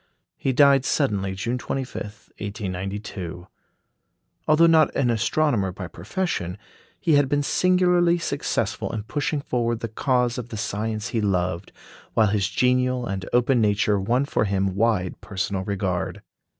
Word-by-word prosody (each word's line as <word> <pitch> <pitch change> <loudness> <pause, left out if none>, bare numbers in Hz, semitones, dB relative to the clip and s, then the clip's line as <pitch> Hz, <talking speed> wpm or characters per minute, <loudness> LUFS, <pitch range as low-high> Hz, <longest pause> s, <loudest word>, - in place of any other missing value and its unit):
He 135 - -1
died 140 0 +5
suddenly 100 -11 0
June 120 +6 -2
25, 135 +1 -4 0.4
1892. 95 -3 -5 1.0
Although 155 +2 +5
not 160 -2 +5
an 125 -3 +2
astronomer 115 -2 +1
by 90 0 -7
profession, 90 - -3 0.4
he 165 - +2
had 145 -2 +4
been 145 0 +1
singularly 180 +1 +3
successful 170 - -2
in 105 - -3
pushing 145 +4 -2
forward 120 -3 -1
the 115 - -2
cause 125 +1 0
of 120 -1 -7
the 110 - -6
science 110 +1 -3
he 115 - -1
loved, 90 -2 -1 0.4
while 110 -2 +4
his 100 -2 +1
genial 125 +4 +1
and 95 -3 -4
open 120 0 +3
nature 105 -1 +2
won 120 +8 +1
for 125 - 0
him 95 -1 0
wide 100 -3 0
personal 95 -1 -3
regard. 95 -1 -2
110 Hz, 140 wpm, -24 LUFS, 95-135 Hz, 1.0 s, died